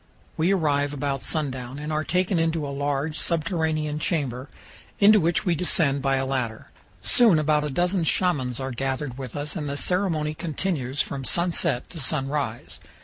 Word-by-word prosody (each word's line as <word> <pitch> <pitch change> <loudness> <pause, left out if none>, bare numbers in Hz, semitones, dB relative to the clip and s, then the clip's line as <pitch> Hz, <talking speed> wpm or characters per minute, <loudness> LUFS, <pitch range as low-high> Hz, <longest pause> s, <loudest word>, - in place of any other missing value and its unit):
We 165 +4 +2
arrive 145 -6 +1
about 140 -1 -2
sundown, 130 -4 -3
and 150 +1 -4
are 155 0 0
taken 180 +1 +1
into 165 -2 0
a 140 - -4
large 145 +2 -2
subterranean 160 -3 -1
chamber, 135 -5 -2 0.5
into 210 +1 +7
which 165 -1 +1
we 175 - +3
descend 150 -4 +2
by 135 0 +1
a 135 0 0
ladder. 125 -5 -3 0.3
Soon 225 -9 +5
about 150 -1 +2
a 150 - -2
dozen 175 +5 0
Shamans 145 -8 +1
are 135 0 -3
gathered 135 +1 -3
with 130 -4 -7
us, 145 0 -4
and 150 -2 -3
the 140 - -3
ceremony 165 -4 0
continues 155 -4 -2
from 135 -1 -6
sunset 170 -4 +1
to 165 - -7
sunrise. 135 -4 -1
150 Hz, 165 wpm, -25 LUFS, 135-165 Hz, 0.5 s, into